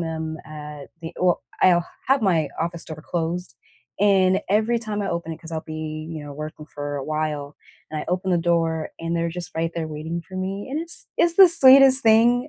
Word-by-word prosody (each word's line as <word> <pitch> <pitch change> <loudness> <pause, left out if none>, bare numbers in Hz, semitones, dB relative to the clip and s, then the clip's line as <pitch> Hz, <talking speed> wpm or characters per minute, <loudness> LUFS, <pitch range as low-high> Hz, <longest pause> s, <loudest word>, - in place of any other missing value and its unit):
them 160 -1 -4
at 150 -2 -9 0.2
the 165 - -6
well, 180 -1 +2 0.2
I'll 175 -2 +5 0.2
have 270 -1 +3
my 165 -7 +2
office 170 0 -3
door 155 0 -9
closed, 170 -4 -3 0.5
and 195 -2 +4
every 220 +4 +2
time 215 -2 -4
I 195 - -2
open 170 -1 -3
it, 160 - -6
‘cause 165 0 -9
I'll 160 - -2
be, 155 0 -6
you 155 -2 -6
know, 145 - -8
working 155 +1 -7
for 145 -1 -6
a 135 - -4
while, 150 -1 -3 0.4
and 155 -1 -3
I - - -7
open 185 +2 -1
the 175 - +3
door, 165 -2 0
and 165 +1 -3
they're 170 0 0
just 175 +1 -6
right 165 0 -1
there 165 -2 -2
waiting 160 +2 -5
for 185 - -9
me, 195 +3 -4
and 295 +3 -2
it's 335 +1 -2
it's 340 0 +3
the 380 0 +9
sweetest 270 -3 +7
thing. 235 +4 +4
170 Hz, 210 wpm, -23 LUFS, 155-200 Hz, 0.5 s, the